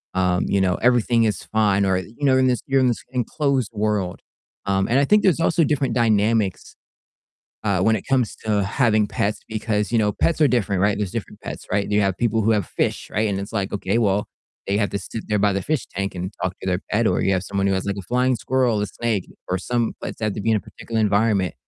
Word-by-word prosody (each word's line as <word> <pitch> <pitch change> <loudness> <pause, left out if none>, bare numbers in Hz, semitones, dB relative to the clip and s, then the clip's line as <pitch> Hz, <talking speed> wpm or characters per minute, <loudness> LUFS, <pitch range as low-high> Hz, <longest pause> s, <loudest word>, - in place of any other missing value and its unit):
um, 90 -1 +1
you 100 - +1
know, 90 -1 +2
everything 120 -1 +3
is 105 - -1
fine 100 -2 +2
or 95 -1 +2
you 110 +5 -11
know, 130 -1 +4
in 130 0 +3
this 125 -2 +1
you're 135 -1 +3
in 130 - +3
this 120 - -1
enclosed 130 0 0
world, 105 -4 -1 0.5
um, 95 -1 +1
and 125 - +3
I 140 - +3
think 210 +5 +4
there's 180 -4 +3
also 165 0 +2
different 145 -3 0
dynamics, 110 -4 +1 0.9
uh, 100 -4 +1
when 110 +4 +3
it 100 - -5
comes 130 -4 +1
to 105 -2 +1
having 110 0 +2
pets 105 +1 -1
because, 105 -1 -1
you - - +3
know, 105 -1 +2
pets 165 - 0
are 150 - +6
different, 105 -6 0
right? 100 0 +2
There's 100 -3 -2
different - - -6
pets, - - -7
right? 100 +1 +2
And - - -5
you 105 - +3
have 95 -2 0
people 115 -2 +1
who 110 - +2
have 105 -5 0
fish, - - -2
right? 105 +2 0
And 100 -1 -2
it's 100 +3 -7
like, 100 -3 -2
okay, 100 0 -1
well, 105 -2 +1 0.4
they 100 - 0
have 105 -2 0
to 100 - -2
sit 110 +3 -7
there 105 - +1
by 100 0 +3
the 100 - -1
fish 150 -2 -1
tank 100 +1 -4
and 90 +1 -4
talk 95 -1 -1
to - - -7
their 90 0 0
pet, 110 +2 +2
or - - +1
you 95 - +2
have 95 -1 0
someone 100 0 -1
who - - +2
has 95 - -2
like 100 0 -2
a 100 - -5
flying 125 +6 +1
squirrel, 125 -4 +1
a 105 - 0
snake, 110 -2 -2 0.2
or 90 - 0
some 120 +4 -1
pets - - -6
have 110 -2 -1
to - - -4
be 115 - +1
in - - +3
a - - -1
particular 115 +2 -5
environment. 105 -2 +2
105 Hz, 250 wpm, -22 LUFS, 100-120 Hz, 0.9 s, are